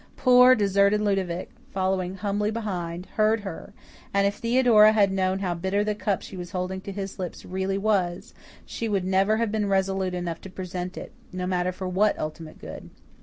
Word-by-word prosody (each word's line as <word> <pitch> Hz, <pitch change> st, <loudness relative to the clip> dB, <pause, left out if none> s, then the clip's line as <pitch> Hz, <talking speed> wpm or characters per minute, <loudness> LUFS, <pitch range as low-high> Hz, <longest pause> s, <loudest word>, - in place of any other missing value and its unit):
Poor, 250 Hz, 0 st, +7 dB
deserted 200 Hz, 0 st, +3 dB
Ludovic, 195 Hz, -4 st, -1 dB, 0.2 s
following 185 Hz, -1 st, -1 dB
humbly 205 Hz, +1 st, -1 dB
behind, 180 Hz, -6 st, -4 dB
heard 215 Hz, +1 st, +3 dB
her, 195 Hz, -, -7 dB, 0.4 s
and 200 Hz, -2 st, +2 dB
if 200 Hz, +1 st, 0 dB
Theodora 230 Hz, -3 st, +5 dB
had 200 Hz, -3 st, +3 dB
known 190 Hz, 0 st, 0 dB
how 190 Hz, -3 st, -1 dB
bitter 190 Hz, +4 st, 0 dB
the 210 Hz, 0 st, 0 dB
cup 205 Hz, -2 st, -2 dB
she -, -, -9 dB
was 175 Hz, -1 st, -6 dB
holding 185 Hz, +1 st, -3 dB
to 200 Hz, -, -7 dB
his 195 Hz, 0 st, -6 dB
lips 180 Hz, -2 st, -6 dB
really 190 Hz, +1 st, -2 dB
was, 195 Hz, -4 st, 0 dB, 0.3 s
she 230 Hz, -, -4 dB
would 195 Hz, -3 st, 0 dB
never 195 Hz, +3 st, +2 dB
have 230 Hz, -2 st, 0 dB
been 210 Hz, -2 st, 0 dB
resolute 190 Hz, -1 st, 0 dB
enough 175 Hz, -2 st, -4 dB
to 190 Hz, -, -9 dB
present 180 Hz, 0 st, -6 dB
it, -, -, -7 dB, 0.2 s
no 180 Hz, 0 st, -4 dB
matter 180 Hz, 0 st, 0 dB
for 185 Hz, +1 st, -6 dB
what 200 Hz, +3 st, +2 dB
ultimate 155 Hz, +1 st, -6 dB
good. -, -, -9 dB
195 Hz, 185 wpm, -25 LUFS, 185-210 Hz, 0.4 s, Poor